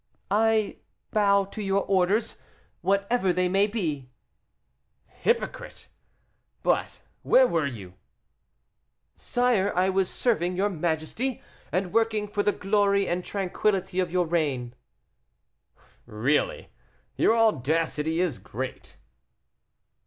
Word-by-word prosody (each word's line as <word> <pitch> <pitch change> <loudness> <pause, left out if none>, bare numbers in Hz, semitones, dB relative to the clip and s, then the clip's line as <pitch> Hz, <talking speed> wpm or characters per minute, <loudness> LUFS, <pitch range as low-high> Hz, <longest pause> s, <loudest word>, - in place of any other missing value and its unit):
"I 220 0 +2 0.3
bow 200 -2 +3
to 205 +2 -8
your 195 0 +1
orders, 195 +3 +1 0.4
whatever 200 +1 +1
they 180 +1 +1
may 195 +3 +3
be." 155 - -3 1.0
"Hypocrite! 465 0 -3 0.7
But - - 0 0.2
where 260 - +5
were 165 - 0
you?" 100 -9 -8 1.2
"Sire, 240 -5 +1
I 185 +2 +2
was 190 -1 +1
serving 180 -7 0
your 200 +3 +1
majesty, 175 +9 -2 0.3
and 185 -1 -1
working 220 -2 +1
for 205 0 -1
the 205 - +2
glory 200 0 +1
and 180 +1 -1
tranquillity 190 -1 -1
of 180 -2 0
your 180 0 +1
reign." 145 -8 -1 1.3
"Really! 145 - 0 0.5
your 225 - +3
audacity 160 - +1
is 165 - -1
great." 125 +6 -7
190 Hz, 105 wpm, -26 LUFS, 165-210 Hz, 1.3 s, where